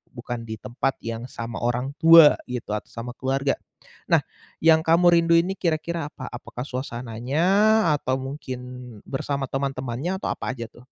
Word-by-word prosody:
bukan 120 -1 -5
di 110 - -4
tempat 130 +3 -2
yang 115 +1 -4
sama 115 -1 -6
orang 120 +3 -1
tua 165 -2 +9 0.2
gitu 125 -4 -5
atau 105 - -4
sama 120 +1 -6
keluarga. 135 +2 0 0.6
Nah - - +5 0.4
yang 160 -1 +6
kamu 170 +2 +5
rindu 170 0 +3
ini 175 +3 +2
kira-kira 165 -1 -1
apa? - - -9
Apakah 120 0 -7
suasananya 125 +2 -3 0.6
atau 130 -1 -1
mungkin 135 -1 -6 0.5
bersama 140 +1 -2
teman-temannya 135 +4 -2
atau - - -3
apa - - -3
aja 115 -2 -5
tuh? 120 - -17
130 Hz, 155 wpm, -24 LUFS, 120-155 Hz, 0.6 s, tua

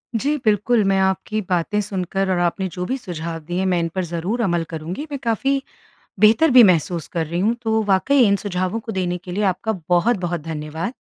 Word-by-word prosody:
जी, 280 +7 +1
बिल्कुल 215 +2 +3
मैं 195 0 +2
आपकी 190 +3 0
बातें 180 +3 0
सुनकर 195 -1 -2
और 185 - +1
आपने 175 +2 0
जो 180 0 -4
भी 260 +7 -2
सुझाव 170 -7 -6
दिए 175 +3 -2
मैं 180 -2 +2
इन 170 - 0
पर 185 - 0
ज़रूर 175 +8 -3
अमल 175 -6 +1
करूँगी। 170 - -5
मैं 280 - -4
काफ़ी 270 +4 0 0.6
बेहतर 220 +9 +5
भी 250 -1 +9
महसूस 170 -3 +2
कर 165 -2 -2
रही 170 +3 -2
हूँ 220 +5 +2
तो 220 -1 +1
वाक़ई 205 +8 +2
इन 200 - +3
सुझावों 185 +1 -2
को 225 0 -7
देने 180 -3 -1
के 180 0 -10
लिए 205 +4 -1
आपका 195 +3 0 0.2
बहुत-बहुत 175 -2 +1
धन्यवाद। 160 - -5
190 Hz, 200 wpm, -21 LUFS, 175-220 Hz, 0.6 s, भी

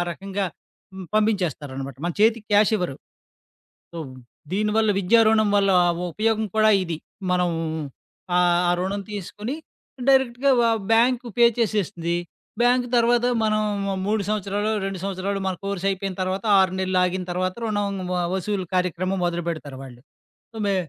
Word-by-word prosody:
రకంగా 195 +3 -3 0.5
హ్మ్, 190 -1 -8
పంపించేస్తారనమాట. 155 - -1
మన 175 - -1
చేతికి 220 0 +3
క్యాష్ 210 +1 +5
ఇవ్వరు. 180 -9 -3 1.0
సో, 170 - -8 0.6
దీనివల్ల 215 +2 +1
విద్యారుణం 215 +2 +4
వల్ల 200 -1 +3 0.2
ఆ - - +3 0.2
ఉపయోగం 220 +4 0
కూడా 215 0 +5
ఇది. 170 -3 -4 0.3
మనం, 180 -1 +2 0.9
ఆ - - +5 0.4
రుణం 195 +2 -2
తీసుకొని 210 +5 -5 0.5
డైరెక్ట్‌గా 265 0 +3
వ - - +4 0.3
బ్యాంక్ 240 +2 +3
పే 240 - +7
చేసేస్తుది. 190 -6 0 0.4
బ్యాంక్ 245 +1 +3
తర్వాత 240 +1 +3 0.2
మనం 215 0 +2 0.4
3 215 +1 +1
సంవత్సరాలో, 205 0 -1
2 195 -1 -4
సంవత్సరాలో, 195 +1 -2
మన 190 - -1
కోర్స్ 200 -1 -3
అయిపోయిన 195 -1 -3
తర్వాత 185 +3 -2
6 190 -1 +3
నెలలు 185 -1 +1
ఆగిన 180 +1 -1
తర్వాత 185 +1 -1
రుణం 205 -2 -1 0.2
వ 180 - 0
వసూలు 190 0 -2
కార్యక్రమం 185 +1 0
మొదలుపెడతారు 170 -5 -3
వాళ్ళు. 125 -2 -12 0.5
సమే 205 -3 0
200 Hz, 130 wpm, -23 LUFS, 180-215 Hz, 1.0 s, పే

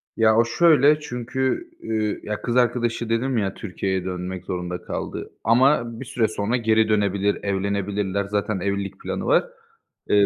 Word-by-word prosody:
Ya, 110 -1 +4
o 115 - +5
şöyle 150 +2 +5
çünkü, 130 - -2
üüü, 110 -1 -2
ya, 105 0 -4
kız 120 - -2
arkadaşı 120 -1 +1
dedim 120 +2 0
ya, 95 -3 0
Türkiye'ye 95 -2 -3
dönmek 90 0 -5
zorunda 90 0 -4
kaldı. - - -5
Ama 120 0 +3
bir 130 - -6
süre 115 -2 +1
sonra 110 +3 -1
geri 110 -2 +2
dönebilir, 100 -1 +1
evlenebilirler. 100 0 -1
Zaten 100 0 -1
evlilik 100 0 -3
planı - - -4
var. - - +4 0.6
Eee, 100 -1 +5
110 Hz, 150 wpm, -23 LUFS, 100-120 Hz, 0.6 s, o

